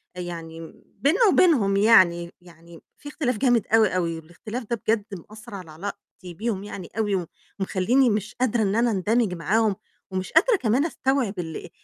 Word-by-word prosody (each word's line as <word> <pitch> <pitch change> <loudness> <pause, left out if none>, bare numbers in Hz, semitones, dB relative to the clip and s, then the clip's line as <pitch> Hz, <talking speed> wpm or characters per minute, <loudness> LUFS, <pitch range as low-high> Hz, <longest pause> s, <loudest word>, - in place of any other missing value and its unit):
يعني 165 -2 -7
بيننا 360 - +1
وبينهم 235 - +4
يعني، 185 -5 +4
يعني 170 -1 -16 0.2
في 290 - -10
اختلاف 255 -6 -2
جامد 245 -4 +2
أوي، 225 -1 +4
أوي 170 -2 -1
والاختلاف 210 +9 -8
ده 235 - +1
بجد 215 -2 +1 0.2
مأثّر 215 -1 -11
على 175 -5 -9
علاقتي 180 +1 -9
بيهم 210 +1 -3
يعني 200 -4 -8
أوي، 210 -3 +1
و 180 -3 -3 0.3
ومخلّيني 215 +7 +2
مش 210 -1 -2
قادرة 240 -2 0
إن 200 0 0
أنا 235 +1 +2
أندمِج 210 +1 +1
معاهم، 210 +4 +1 0.4
ومش 185 -1 -4
قادرة - - +5
كمان 255 - +1
أستوعب 265 - -1
ال 160 -3 -6
205 Hz, 160 wpm, -24 LUFS, 180-235 Hz, 0.4 s, قادرة